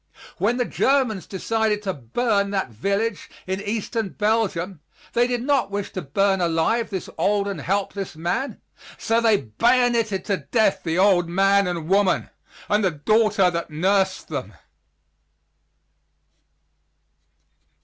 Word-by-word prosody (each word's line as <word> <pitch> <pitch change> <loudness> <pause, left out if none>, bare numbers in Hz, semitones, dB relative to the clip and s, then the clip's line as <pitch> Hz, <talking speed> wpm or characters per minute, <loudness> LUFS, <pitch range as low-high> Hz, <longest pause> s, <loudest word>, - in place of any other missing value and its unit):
When 230 +5 +1
the 245 - +1
Germans 255 -9 +1
decided 215 +1 -1
to 190 -2 -1
burn 200 - 0
that 195 -10 -2
village 200 - -2 0.2
in 190 +1 -3
Eastern 220 0 -2
Belgium, 200 -5 -1 0.3
they 240 +1 +3
did 245 -1 -2
not 275 -4 +1
wish 200 0 -4
to 185 - -4
burn 190 +6 +1
alive 175 +8 +1
this 190 -3 -4
old 200 +3 +1
and 200 - -4
helpless 195 -1 -2
man, 180 - -2 0.4
so 230 +1 +1
they 225 -3 +4
bayonetted 230 - +1
to 200 -2 0
death 190 +9 +1
the 165 0 -1
old 185 -3 +4
man 195 +2 +3
and 170 -3 -3
woman, 195 0 +2 0.4
and 210 0 +2
the 190 - +3
daughter 200 +4 +2
that 170 0 -3
nursed 190 +4 0
them. 125 - -5
200 Hz, 130 wpm, -23 LUFS, 180-225 Hz, 0.4 s, they